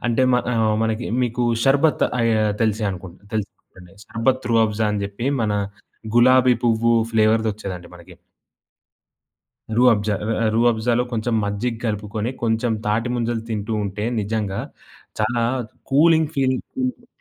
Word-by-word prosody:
అంటే 120 +1 +2
మ 125 - +4 0.2
ఆహ్, 110 -1 +2
మనకి 110 +2 -1 0.2
మీకూ 120 0 -1 0.2
షర్బత్ 145 +3 +3
అయా 115 -2 +2 0.2
తెలిసే 110 0 0
అనుకుంటా, 90 -1 -9
తెలుసనుకుంటండి 95 -3 -7
షర్బత్ 130 +5 -1
రుఅబ్జా 110 -1 +2
అని 105 -1 -2
చెప్పి, 100 +5 -5 0.2
మన 105 -1 0 0.6
గులాబీ 125 +1 +6
పువ్వు 115 0 +3 0.2
ఫ్లేవరుదొచ్చేదండి 110 -4 0
మనకి. 90 +1 -14 1.6
రుఅబ్జా, 110 -4 +3
రా 115 - +1 0.2
రుఅబ్జాలో 120 +1 +2
కొంచెం 115 +1 -1
మజ్జిగ 105 +4 -2
కలుపుకొని, 105 +1 -2
కొంచెం 115 +1 +1
తాటిముంజలు 115 +1 -1
తింటూ 105 0 -3
ఉంటే, 100 +1 -4 0.2
నిజంగా 105 -2 -2 0.6
చాలా 115 +2 +1 0.5
కూలింగ్ 160 +2 +4
ఫీలింగ్ 130 -1 +1 0.2
ఉంటది. 250 -1 -4
115 Hz, 120 wpm, -21 LUFS, 105-120 Hz, 1.6 s, గులాబీ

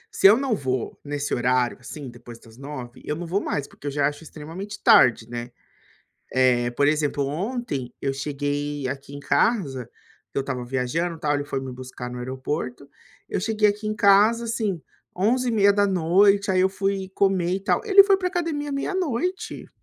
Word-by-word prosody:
se - - +7
eu 210 +4 +7
não 265 -4 0
vou 130 -5 -3
nesse 145 0 -3
horário 125 0 +1
assim 135 +3 -8
depois 120 -1 -11
das 115 -1 -17
21h, 130 -3 -8
eu 150 - -3
não 175 - -5
vou 185 +5 -1
mais, 140 - -2
porque 145 - -11
eu - - -1
já 140 0 +2
acho 145 +2 -5
extremamente 165 +7 -8
tarde, 120 -3 +6
né? 120 0 -6 0.8
Eh, 125 -2 +3
por 145 +4 +2
exemplo, 150 -2 0
ontem 160 - -3
eu 135 - 0
cheguei 145 0 -3
aqui 135 +1 -6
em 145 - -7
casa, 140 - +1 0.4
que - - -14
eu 140 - +2
estava 130 -2 -4
viajando 135 +7 -2
e - - -18
tal, 145 -1 +1
ele 145 - -3
foi 135 -2 -3
me 130 -1 -6
buscar 125 -1 -8
no 125 - -6
aeroporto, 130 +2 -4 0.4
eu - - -2
cheguei 215 0 +2
aqui 210 +1 -2
em 215 - -1
casa 215 +4 +4
assim 215 -7 -2 0.3
23:30h, 200 -3 +3
aí 185 -1 +3
eu 190 - +4
fui 195 0 -2
comer 185 -3 +2
e 195 - -2
tal, 195 - +1
ele 395 -2 +8
foi 395 -1 +4
pra 370 -1 -3
academia 325 -5 -2
meia-noite. 360 +3 -2
150 Hz, 180 wpm, -24 LUFS, 130-205 Hz, 0.8 s, ele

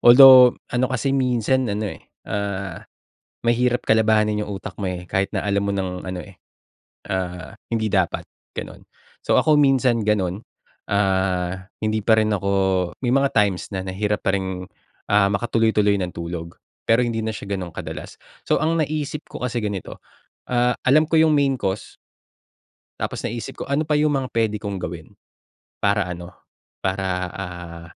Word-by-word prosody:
although 125 0 +9 0.2
ano 125 +1 +1
kasi 130 +1 -1
minsan 130 -1 +1
ano, 105 0 -2
eh, - - -12 0.2
ah, 100 -3 -3 0.6
mahirap 120 +1 +2
kalabahanin 105 -1 +3
yung - - -6
utak - - -8
mo, 100 - -3
eh, 90 -1 -5
kahit 95 0 0
na - - 0
alam 100 0 +1
mo 100 - 0
ng 95 -2 -3
ano, 95 -1 -4
eh, 100 -2 -14 0.8
ah, 90 0 -4 0.2
hindi 110 -2 -1
dapat, 95 -4 +1 0.3
gano'n. - - -7 0.4
So, - - +2
ako 155 - +4
minsan 130 -4 +3
ganun, 100 -1 0 0.5
ah, 95 -1 0
hindi 110 0 0
pa 110 +1 +4
rin 110 0 +2
ako 100 -1 -1 0.5
may 120 - +2
mga 135 0 +3
times 100 -4 +2
na 95 -2 -4
nahirap 105 +2 -2
pa 95 - +3
rin, 95 -1 -3 0.5
ah, 105 -1 +5
makatuloy-tuloy 105 -1 +2
ng 90 -1 -3
tulog 85 0 -6 0.3
pero 115 +1 +3
hindi 115 -1 -2
na 110 - -1
siya 100 -2 -5
gano'n 90 -2 -4
kadalas. - - -8 0.2
So, - - +1
ang 165 +1 +1
naisip 150 0 -3
ko - - -7
kasi 120 -2 -2
ganito, 100 -4 -5 0.5
ah, 125 0 +2
alam 150 +4 +4
ko 160 - +3
yung 160 -1 +5
main 140 -2 +2
cause. 95 -2 -4 1.0
Tapos - - -3
naisip 115 0 -5
ko, - - -1
"Ano 145 +2 +1
pa 150 - +3
yung 150 0 +2
mga 130 -2 -2
pwede 110 -2 +1
kong 100 -2 -4
gawin, 85 -2 -7 0.7
para 100 -1 +2
ano, 85 -1 -6 0.6
para, 95 0 0 0.3
ah, 90 -3 -7
105 Hz, 165 wpm, -22 LUFS, 95-120 Hz, 1.0 s, although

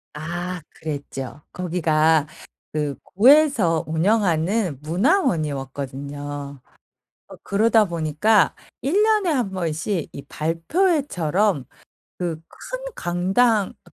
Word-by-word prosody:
아 175 +3 -4
그랬죠. 145 -2 -6
거기가 160 -3 +2 0.4
그 150 -2 -2
구에서 230 - +4
운영하는 175 - +1
문화원이었거든요. 145 - -2 0.7
어 - - -11
그러다 220 +2 +3
보니까 170 +5 +2 0.3
1 355 - +2
년에 425 -5 +2
1 250 -10 0
번씩 170 0 -2
이 140 - -8
발표회처럼 180 - 0 0.5
그 170 -3 -3
큰 - - -7 0.2
강당 195 +5 +1
그 - - -21
175 Hz, 195 characters per minute, -22 LUFS, 155-220 Hz, 0.7 s, 구에서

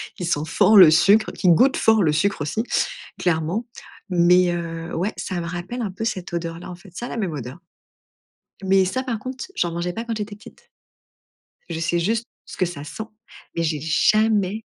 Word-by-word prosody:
qui 180 - -5
sent 155 -4 +1
fort 210 +6 +4
le 175 -5 +10
sucre, 200 +7 +4
qui 185 - +1
goûte 255 +11 +5
fort 220 -3 +4
le 155 - +3
sucre 200 +2 0
aussi, 185 +10 -1 0.6
clairement 175 +6 0 0.5
mais 175 +1 +4
heu, 165 -1 -5
ouais, 190 +6 -1
ça 185 -3 -4
me 170 - -4
rappelle 180 +8 -5
un 205 -4 -3
peu 220 +4 -6
cette 185 -5 -3
odeur-là, 170 +1 -4
en 180 - -7
fait, 185 +3 -16
ça 240 - -5
a - - -6
la - - -5
même 195 -7 -2
odeur. 135 +2 -7 1.0
Mais 190 0 +3
ça, 260 +8 -2
par 235 -5 -3
contre, 255 - -6
j'en 175 - 0
mangeais 175 +1 -3
pas 230 - -4
quand 230 -1 -3
j'étais 210 -1 -5
petite. 210 - -17 1.0
Je 165 -1 -4
sais 170 +1 0
juste 225 +6 0 0.2
ce - - -11
que 185 - +2
ça 150 -4 -6
sent, 195 +8 -6 0.5
mais 165 - 0
j'ai 155 -2 -1
jamais 215 - +2
180 Hz, 200 wpm, -22 LUFS, 170-215 Hz, 1.0 s, le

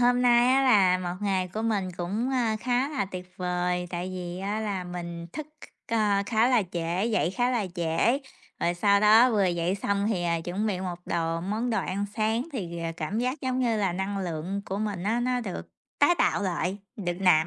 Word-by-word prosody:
hôm 245 0 +4
nay 240 0 +5
á 270 - +4
là 195 -8 +5
một 175 -1 -3
ngày 190 -3 0
của 215 +5 -4
mình 210 -5 0
cũng, 205 +9 -2
ơ, 235 -4 +1
khá 250 +3 +1
là 280 -6 -1
tuyệt 185 -1 -8
vời, 180 -1 -1
tại 175 +1 -3
vì 175 -1 -5
á 200 +3 -2
là 200 -4 -2
mình 170 -1 -6
thức 310 -2 -5 0.4
c - - -7
ơ, 210 -3 +3
khá 225 +1 +3
là 245 -4 +4
trễ, 170 +3 -1
dậy 220 -7 +1
khá 245 +5 +1
là 235 -6 0
trễ, 170 +10 +2 0.4
rồi 175 - +1
sau 200 +3 +3
đó 220 +4 +7
vừa 205 -4 +2
dậy 175 +1 0
xong 200 0 0
thì, 190 -6 0
à, 170 -1 0
chuẩn 180 +6 -2
bị 190 -4 -1
một 180 -2 -4
đồ 165 0 -1
món 215 +7 -2
đồ 220 - +1
ăn 195 +2 -2
sáng 225 +5 0
thì, 175 -9 -4
ờ, 165 0 -2
cảm 180 +6 -2
giác 255 +5 -1
giống 260 -1 -1
như 230 -3 +2
là 195 -4 +1
năng 190 +2 -2
lượng 180 +2 -3
của 195 - -3
mình 205 -4 -2
nó 225 +5 +1
nó 250 0 0
được 200 -6 -6 0.3
tái 350 - +5
tạo - - +2
lại, 185 +1 -1 0.2
được 180 -5 -2
nạp 160 -4 +5
200 Hz, 220 wpm, -27 LUFS, 180-230 Hz, 0.4 s, đó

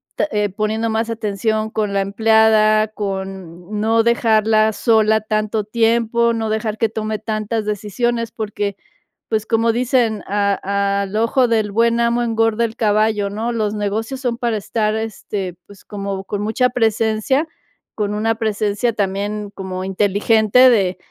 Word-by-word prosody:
ta - - 0 0.3
poniendo 220 +2 -1
más 225 +1 -1
atención 220 0 -1
con 210 -2 -1
la 195 - +1
empleada, 215 +1 +3
con 190 -2 -6
no 225 +1 +3
dejarla 220 -2 +3
sola 220 -2 +3
tanto 215 0 -1
tiempo, 230 +1 +1
no 225 -1 -2
dejar 215 0 -2
que 225 0 +1
tome 215 0 -3
tantas 215 0 -3
decisiones, 225 +3 -2
porque, 205 -3 -3 0.5
pues, 220 -1 0
como 230 0 +2
dicen, 240 -3 +1
a 200 0 0
a 200 0 0
al 195 +1 -6
ojo 230 +3 +2
del 220 -3 0
buen 230 +2 +2
amo, 235 +1 +1
engorda 225 0 +1
el 225 -1 -6
caballo, 215 -1 +1
¿no? 225 +4 -3
Los 215 -2 -1
negocios 215 +5 -3
son 240 -2 -1
para 235 -3 -1
estar, 215 +1 -1
este, 205 -4 -4
pues, 200 -2 -17
como 200 -1 -5
con 205 +1 -4
mucha 225 +4 +1
presencia, 225 +5 +1 0.5
con 210 -1 -2
una 225 +2 0
presencia 215 +1 -1
también, 205 +1 -2
como 185 -1 -5
inteligente 210 +5 +4
de 195 -6 +2
215 Hz, 150 wpm, -19 LUFS, 205-225 Hz, 0.5 s, inteligente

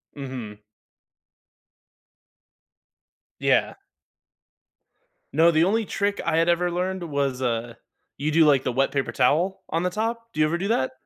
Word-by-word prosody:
Mhm. 130 -7 -7 2.8
Yeah. - - +2 1.6
No, 165 +4 +5
the 160 0 +3
only 215 +5 +1
trick 200 +1 -1
I - - +1
had 165 +1 +3
ever 175 +1 +1
learned 185 +1 -2
was, 140 -5 -2
uh, 120 -1 -2 0.4
you 150 +2 -1
do, 160 +1 +5
like, 140 -3 +4
the 130 - -1
wet 135 +3 +1
paper 140 -1 -1
towel 165 +9 +1
on 165 +2 -1
the 180 - +1
top, 230 +4 -4
do - - -6
you 155 - +5
ever 160 +3 0
do 195 +4 -3
that? 130 - +1
160 Hz, 145 wpm, -24 LUFS, 135-180 Hz, 2.8 s, No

